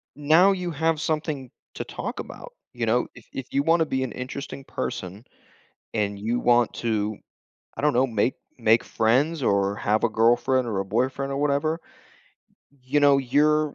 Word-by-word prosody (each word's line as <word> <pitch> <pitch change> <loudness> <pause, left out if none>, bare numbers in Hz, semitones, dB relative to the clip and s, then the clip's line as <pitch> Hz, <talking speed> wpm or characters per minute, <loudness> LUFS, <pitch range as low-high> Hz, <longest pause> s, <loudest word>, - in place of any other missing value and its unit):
y 145 - -11
now 175 +6 +6
you 180 -2 -2
have 160 0 0
something 150 -5 -2 0.3
to - - -3
talk - - -6
about, - - -8 0.2
you 120 -1 -2
know? 120 +3 +1
If 125 - -14
if 135 -1 -5
you 140 - +3
wanna 165 +1 +3
be 130 -3 -1
an 130 - -4
interesting 135 +2 -6
person 95 +5 -5 0.7
and 105 -2 -1
you 115 +4 -1
want 120 -1 +3
to, 110 -2 -1 0.6
I - - -5
don't 150 0 +3
know, 130 +2 +3
make 115 +1 0 0.2
make 115 -1 +4
friends 135 +8 +1
or 100 -3 +1
have 105 +2 0
a - - +4
girlfriend 120 +3 +2
or 105 -4 -1
a - - -2
boyfriend 130 +6 -1
or 135 - -2
whatever, 150 +3 0 0.9
y 140 - -28
you 145 +3 +1
know, 140 -1 +5
you're 150 +3 +2
130 Hz, 180 wpm, -25 LUFS, 115-150 Hz, 0.9 s, now